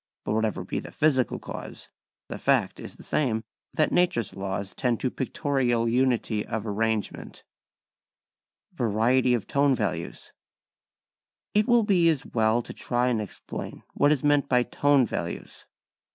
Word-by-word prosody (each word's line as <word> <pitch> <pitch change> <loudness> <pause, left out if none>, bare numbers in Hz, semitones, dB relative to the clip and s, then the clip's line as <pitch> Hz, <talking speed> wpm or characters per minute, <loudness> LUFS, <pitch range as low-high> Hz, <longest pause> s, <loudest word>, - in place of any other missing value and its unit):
But - - -2
whatever 110 -2 0
be - - -3
the - - -9
physical 135 -5 +1
cause, - - -8 0.4
the - - -6
fact - - +1
is - - -8
the - - -14
same, 115 -7 0 0.3
that 155 - +2
nature's 175 - +1
laws 95 0 -4
tend 120 -3 0
to 130 - 0
pictorial 125 -3 0
unity 120 -3 +1
of 110 -1 -4
arrangement. 110 0 -2 1.3
[Sidenote: 120 - -1
Variety 125 +3 +3
of 110 -5 -3
Tone 140 -1 +2
Values] 90 -7 -4 1.2
It 210 +1 +3
will 240 -1 +5
be 180 -5 +4
as 155 -5 0
well 110 +1 +1
to - - -9
try 125 +1 0
and 115 -3 0
explain 105 - -7
what 145 - +3
is 150 -2 +1
meant 145 -1 +3
by 125 -1 +4
tone 145 0 +3
values. - - -6
125 Hz, 150 wpm, -26 LUFS, 110-145 Hz, 1.3 s, will